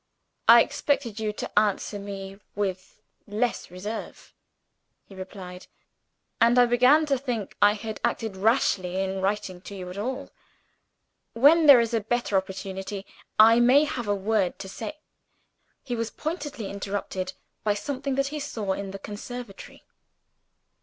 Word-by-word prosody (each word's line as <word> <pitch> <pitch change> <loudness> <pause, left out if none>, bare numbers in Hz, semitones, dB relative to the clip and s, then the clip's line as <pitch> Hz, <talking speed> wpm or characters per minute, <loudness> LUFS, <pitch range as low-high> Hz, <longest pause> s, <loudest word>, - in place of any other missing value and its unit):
"I 230 +1 +9
expected 280 -6 -1
you 215 -1 -1
to 210 - 0
answer 205 0 -1
me 195 -1 -7 0.2
with 190 -2 -3 0.3
less 220 +4 -1
reserve," 200 +5 -7 0.7
he - - -15
replied; 185 -1 -9 0.7
"and 235 +1 +5
I 245 - +7
began 250 +6 +5
to 275 -3 +1
think 245 -6 -4
I 205 0 +6
had 220 +1 -6
acted 220 -4 -1
rashly 190 -4 +1
in 190 0 -2
writing 190 -2 -2
to 200 - -9
you 180 -1 -7
at 190 - -7
all. 255 +5 -4 1.0
When 300 +7 +6
there 275 -4 +10
is 230 0 0
a 230 - +3
better 235 -1 -1
opportunity, 190 +1 -3 0.3
I 225 +2 +7
may 255 +5 +6
have 260 -7 -3
a 205 - +2
word 200 -1 0
to 195 - -7
say 225 +9 -6 0.4
" - - -45
He 245 -4 -3
was 230 -1 -2
apparently 295 - -5
interrupted 195 -2 -4 0.3
by 210 -1 +2
something 270 +5 -3
that 275 0 0
he 300 +1 -4
saw 220 -9 -3
in 200 0 -5
the 195 - -6
conservatory. 210 +2 -9
215 Hz, 150 wpm, -26 LUFS, 195-245 Hz, 1.0 s, there